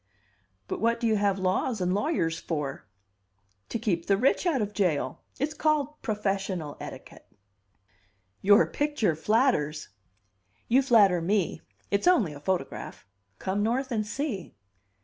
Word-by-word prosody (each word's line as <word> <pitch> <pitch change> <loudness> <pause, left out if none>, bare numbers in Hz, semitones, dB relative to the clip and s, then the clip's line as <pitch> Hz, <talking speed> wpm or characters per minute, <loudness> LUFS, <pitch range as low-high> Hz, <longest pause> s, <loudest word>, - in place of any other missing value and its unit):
"But - - -4
what 230 +1 +2
do 235 - -2
you 220 -1 +3
have 200 -1 +1
laws 190 +5 0
and 180 0 0
lawyers 195 - 0
for?" 150 -8 -4 0.8
"To - - -2
keep 175 -7 -1
the 195 - +3
rich 270 - +2
out 305 -6 +2
of 210 -1 -2
jail. 180 -8 0 0.2
It's 290 +3 -1
called 300 -1 0
'professional 195 - -2
etiquette.'" - - -10 1.1
"Your 205 +4 +6
picture 290 - 0
flatters!" 160 - +1 0.8
"You 255 +4 +4
flatter 210 -9 +5
me; 185 -1 0 0.3
it's 200 +10 +1
only 240 - +4
a 145 - -9
photograph. 180 +4 -3 0.3
Come 195 +2 -2
North 250 +5 0
and 220 -3 0
see." 225 - -4
205 Hz, 135 wpm, -27 LUFS, 180-255 Hz, 1.1 s, Your